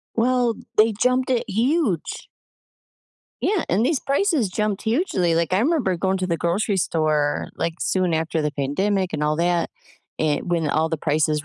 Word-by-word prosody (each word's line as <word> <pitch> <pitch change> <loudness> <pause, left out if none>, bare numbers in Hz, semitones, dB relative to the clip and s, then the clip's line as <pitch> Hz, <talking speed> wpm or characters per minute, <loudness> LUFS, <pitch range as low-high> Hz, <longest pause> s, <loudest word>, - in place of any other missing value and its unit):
Well, 245 0 +2 0.2
they 220 +1 +5
jumped 255 +1 +2
it 245 -1 +1
huge. 230 - 0 1.2
Yeah, 400 -5 +1
and 215 +8 +2
these 300 -3 +1
prices 280 - +1
jumped 210 +1 -2
hugely, 220 - +1
like, 170 +2 0
I 190 - +3
remember 255 - +1
going 190 +2 0
to 185 - -1
the 170 -2 0
grocery 195 +5 0
store, 155 -4 0
like, 165 0 -2
soon 185 -3 +1
after 160 0 -1
the 150 - 0
pandemic 185 +7 -1
and 150 - -2
all 150 0 +1
that, 170 0 +1 0.5
an 155 +2 0
when 165 -3 0
all 160 +2 +1
the 160 - -2
prices 150 0 0
185 Hz, 170 wpm, -22 LUFS, 160-230 Hz, 1.2 s, they